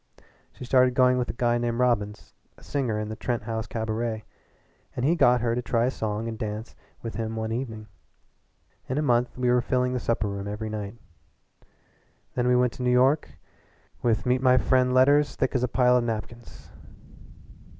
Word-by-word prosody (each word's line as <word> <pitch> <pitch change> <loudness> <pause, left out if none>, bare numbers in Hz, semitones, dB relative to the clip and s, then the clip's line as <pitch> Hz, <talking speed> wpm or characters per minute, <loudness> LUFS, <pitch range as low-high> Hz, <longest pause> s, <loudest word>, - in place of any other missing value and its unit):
She 125 - -9
started 125 0 +3
going 125 -1 +4
with 125 - -2
a - - -2
guy 120 0 +1
named 120 -1 -1
Robbins, 110 -4 -1 0.2
a - - -18
singer 125 -7 -2
in 105 0 -3
the 110 - -5
Trent 120 +1 -3
House 110 -1 -4
cabaret, 110 0 -3 0.7
and 125 - -1
he 165 +4 +3
got 125 -7 +4
her 115 -1 0
to 125 - -1
try 120 -1 +1
a 130 - +1
song 110 -1 -3
and 110 -1 -6
dance 110 0 -5 0.3
with 115 - -5
him 115 0 -4
one 110 0 -3
evening. 115 -3 -4 1.0
In 130 - -1
a 150 - +1
month 120 -3 +1
we 125 -1 +1
were 125 0 +3
filling 125 0 0
the 125 - -1
supper 115 -3 -1
room 100 0 -5
every 105 +1 -4
night. 105 0 -5 1.4
Then 125 -1 0
we 125 - +4
went 125 -1 +2
to 120 - -9
New 125 - +1
York 130 +5 +2 0.6
with 115 -2 +1
meet 125 0 +2
my 130 -1 +5
friend 130 0 +2
letters 140 +3 +4
thick 130 - -1
as 130 - +1
a 125 - +1
pile 125 0 +3
of 120 - +1
napkins. 115 +1 -6
120 Hz, 190 wpm, -26 LUFS, 110-125 Hz, 1.4 s, my